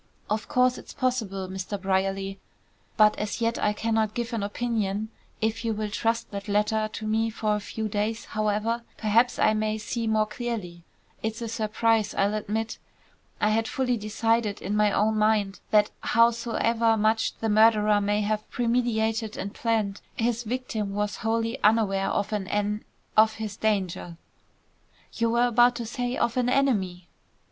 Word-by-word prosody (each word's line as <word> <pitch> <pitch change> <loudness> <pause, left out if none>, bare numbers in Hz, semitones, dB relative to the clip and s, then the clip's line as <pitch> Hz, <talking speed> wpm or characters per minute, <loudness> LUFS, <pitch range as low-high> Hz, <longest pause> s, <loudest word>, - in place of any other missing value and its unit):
"Of 215 +1 -1
course 250 0 +2
it's - - -12
possible, 220 -8 -1
Mr. 190 +2 -5
Brierly, 195 0 -1 0.6
but 215 -1 +6
as 210 +2 -3
yet 230 0 0
I 210 - +2
cannot 220 0 0
give 235 0 -3
an 225 - -1
opinion. 215 -1 -2 0.3
If 225 +1 -1
you 225 -1 0
will 210 0 -3
trust 230 +2 -1
that 200 0 -6
letter 210 +1 +1
to 220 - -5
me 220 +1 +1
for 215 -1 0
a - - -1
few 220 +1 -4
days, 215 +2 -2
however, 215 +2 -1 0.2
perhaps 230 +3 +2
I 215 - +4
may 215 0 0
see 225 +2 -3
more 215 -1 +2
clearly. 215 -7 -5 0.4
It's 220 0 -3
a 230 - -4
surprise, 220 -1 0
I'll 200 +1 +2
admit. 215 +1 -3 0.6
I 210 - +3
had 225 +1 +1
fully 250 -2 0
decided 220 0 0
in 200 +3 -3
my 210 -1 +3
own 215 +2 +2
mind 210 -2 +2
that 210 -1 +4
howsoever 230 -3 +2
much 220 +1 +1
the 225 - -2
murderer 215 -1 +5
may 205 +1 +1
have 215 +1 -2
premeditated 225 -2 0
and 200 +1 -5
planned, 215 -4 -1
his 235 0 0
victim 220 -4 -3
was 205 0 -1
wholly 230 +3 -1
unaware 210 -3 +3
of 205 +2 -1
an 200 -3 -2
en 210 +1 -1 0.3
of 220 0 +6
his 215 -2 -5
danger." 190 -6 -1 1.0
"You 230 0 0
were 235 +1 +3
about 245 +1 +4
to 235 -1 -4
say, 245 +2 -3
of 235 +1 0
an 250 -1 +2
enemy!" 195 -10 +1
220 Hz, 165 wpm, -26 LUFS, 210-230 Hz, 1.0 s, but